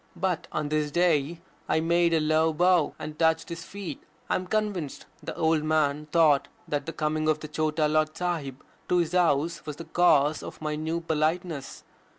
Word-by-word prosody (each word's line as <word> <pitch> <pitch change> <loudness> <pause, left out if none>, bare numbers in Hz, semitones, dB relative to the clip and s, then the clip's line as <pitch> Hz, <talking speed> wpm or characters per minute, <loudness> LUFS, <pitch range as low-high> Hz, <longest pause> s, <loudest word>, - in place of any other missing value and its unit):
But 180 -1 -1
on 150 -1 -2
this 150 -1 0
day 165 -1 +1 0.3
I - - +3
made 170 +1 +2
a 165 - +3
low 155 +1 +2
bow, 175 -1 +3
and 150 0 -7
touched 160 0 +2
his 165 -1 -6
feet. 185 -4 -7 0.3
I - - +3
am 185 - -3
convinced 205 -8 -2 0.2
the - - -6
old 160 -2 +2
man 150 -1 +1
thought 155 -3 +4 0.2
that 145 +2 -2
the - - -2
coming 155 0 -1
of 155 0 +1
the 155 - -6
Chota 155 0 0
Lord 155 0 +1
Sahib 155 -7 -3 0.3
to 180 - +3
his 170 -2 +1
house 170 -3 +1
was 150 -2 -6
the 165 - -9
cause 155 -4 +3
of - - -9
my 155 -1 -2
new 160 +2 -2
politeness. 160 -1 -2
155 Hz, 185 wpm, -27 LUFS, 150-170 Hz, 0.3 s, thought